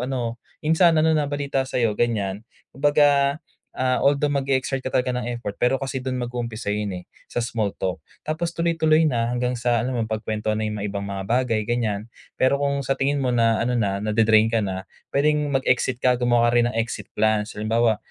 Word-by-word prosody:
ano?" 120 -3 -3 0.2
"Insan, 160 +1 +4
ano 160 0 +3
na 150 - +1
balita 140 -2 -1
sa'yo?" 115 -5 0
ganyan. 105 -3 -1 0.3
Kumbaga, 145 0 +3 0.3
ah, 130 0 0
although 140 +1 +3
mag-e-exert 135 -1 -1
ka 130 - -4
talaga 125 0 +1
ng 120 0 -3
effort, 120 -4 -5
pero 130 +2 +1
kasi 135 0 -4
do'n 130 -1 -2
mag-uumpisa 120 -3 -5
yun, 105 -1 -1
eh, - - -17 0.2
sa - - -3
small 115 -4 -1
talk. 95 -1 -3 0.2
Tapos 160 +2 -3
tuloy-tuloy 160 -2 +2
na 120 -3 0
hanggang 125 0 -1
sa 120 -1 +1
ano, 125 +1 -2
mapagkwentuhan 110 -1 -2
na 110 - -1
'yung 105 - -4
mga 105 - -2
ibang 100 0 -4
mga 95 -1 -4
bagay 115 -1 0
ganyan. 110 -3 -1 0.3
Pero 140 +2 +2
kung 140 -1 0
sa 135 +2 -1
tingin 140 +1 +1
mo 125 - +1
na 115 -1 +2
ano 125 - 0
na, 100 -2 0
na-de-drain 110 +1 +3
ka 115 - +2
na, 95 -2 -3 0.2
pwedeng 145 -1 +1
mag-exit 130 -1 +1
ka, 125 - +5
gumawa 120 -1 +3
ka 120 - +4
rin 120 - +2
ng 115 - -5
exit 115 +1 -3
plans. 110 0 +1
Halimbawa, 110 +1 +2
120 Hz, 195 wpm, -23 LUFS, 110-140 Hz, 0.3 s, ka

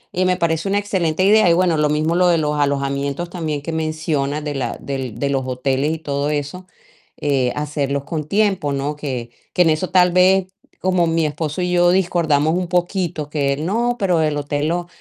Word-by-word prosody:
y 185 +1 +1
me 180 0 +2
parece 165 +1 0
una 200 - +1
excelente 185 -4 0
idea, 210 -2 +5
y - - +5
bueno, 175 -1 +2
lo 150 -1 +2
mismo 155 +3 +1
lo 180 0 +4
de 170 -1 +4
los 150 -1 -1
alojamientos 140 +3 -1
también 155 -5 -3
que 165 - -5
mencionas 155 -2 -2
de 145 -2 -4
la 125 -3 -3
del 130 -5 -5
de 140 - 0
los 135 -1 0
hoteles 135 +4 -1
y 160 - -5
todo 145 -1 -2
eso, 150 +5 -4 0.6
eh, 135 -4 +1
hacerlos 145 -2 -2
con 155 -2 -3
tiempo, 195 -8 +1
¿no?, 140 +2 -2
que 130 -5 -5 0.2
que 180 - +2
en 165 - +3
eso 155 +4 0
tal 180 -1 +5
vez 185 +1 +4 0.3
como 185 -2 +2
mi 165 -1 +1
esposo 150 +3 -3
y 180 0 -1
yo 175 0 +4
discordamos 165 -4 +2
un 180 -1 -2
poquito, 175 -4 -1
que 140 -2 0
él: 150 +3 -4
"No, 240 +4 0
pero 180 -5 +2
el 150 -1 0
hotel 145 +1 -2
lo 175 0 -2
155 Hz, 210 wpm, -20 LUFS, 145-180 Hz, 0.6 s, idea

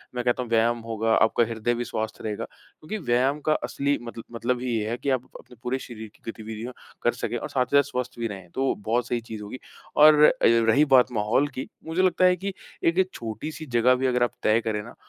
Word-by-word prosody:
मैं 125 - -1
कहता 125 +1 +1
हूँ 120 - -10
व्यायाम 115 +1 +2
होगा, 115 0 -1
आपका 110 +1 +3
हृदय 115 +1 -1
भी 120 - -2
स्वस्थ 110 -1 -4
रहेगा 105 -2 -3
क्योंकि 165 +8 -10
व्यायाम 130 +4 +2
का 155 - +5
असली 140 +1 0
मतल 115 -1 -7
मतलब 120 +1 -1
ही 125 - -3
ये 105 0 -2
है 120 - -2
कि 140 - -3
आप 130 -2 0
अपने 125 - -16
पूरे 130 +2 -1
शरीर 110 -4 -9
की 115 - -7
गतिविधियाँ 110 +2 -7 0.3
कर - - +3
सकें - - -3
और - - -5
साथ 125 - +1
ही - - +7
साथ 140 -1 +3
स्वस्थ 125 0 -4
भी 115 - -1
रहें 95 -4 -9
तो 135 0 +1
बहुत 120 +2 0
सही 120 - 0
चीज़ 110 -2 -8
होगी 105 +5 -8 0.4
और 150 0 +7
अ, - - +8
रही 115 +5 +5
बात 125 0 +5
माहौल 110 +5 +1
की, 130 -2 -6 0.2
मुझे 165 +3 0
लगता 185 0 +3
है 180 0 +5
कि 195 +2 -4 0.3
एक 185 +3 +2
छोटी-सी 120 +8 -6
जगह 125 +2 +5
भी 130 +1 0
अगर 125 -1 +2
आप 120 - +1
तय 110 +2 +3
करें 110 -2 -2
ना 120 - -12
120 Hz, 235 wpm, -25 LUFS, 110-135 Hz, 0.4 s, अ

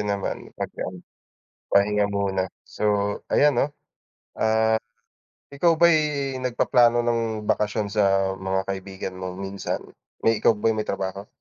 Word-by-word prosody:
naman 100 -1 -3
pagka - - -5
ano, 90 -1 -10 0.7
pahinga 105 +1 +3
muna. 95 -2 -1 0.2
So - - -12 0.5
ayan 145 0 +4
'no, 135 +4 +1 0.7
ah, 110 0 +3 0.7
ikaw 165 +4 +3
ba'y 170 0 +6 0.4
nagpaplano 120 -1 +3
ng 115 -2 -1
bakasyon 105 0 0
sa 95 -2 +2
mga 95 0 -1
kaibigan 95 -1 -6
mo 90 0 -5
minsan? 95 +1 -4 0.4
May 115 -1 +3
ikaw 115 - +4
ba 110 +2 +1
ay - - -2
may 105 - -3
trabaho? 95 +1 -3
105 Hz, 130 wpm, -24 LUFS, 95-115 Hz, 0.7 s, ba'y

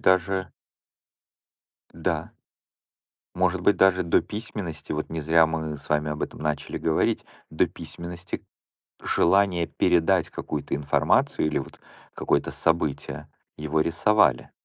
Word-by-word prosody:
даже 95 0 +2 1.4
Да. - - -2 1.1
Может 90 0 +1
быть, 100 +3 +3
даже 95 -1 +4
до 85 - +3
письменности, 100 -9 -6
вот 75 0 -3
не 80 0 -3
зря 80 +2 +4
мы 80 -1 -3
с - - -9
вами 75 0 +1
об 75 0 -4
этом - - -5
начали 75 -1 -2
говорить. 80 -1 +1 0.3
До - - +2
письменности 85 +1 -7 0.6
желание 90 -2 +3
передать 90 +1 +2
какую-то - - -4
информацию 70 +1 +2
или 75 - 0
вот - - -7 0.3
какое-то - - 0
событие- 80 -4 -1 0.3
его 75 +1 0
рисовали. 85 - +2
85 Hz, 120 wpm, -25 LUFS, 75-95 Hz, 1.4 s, даже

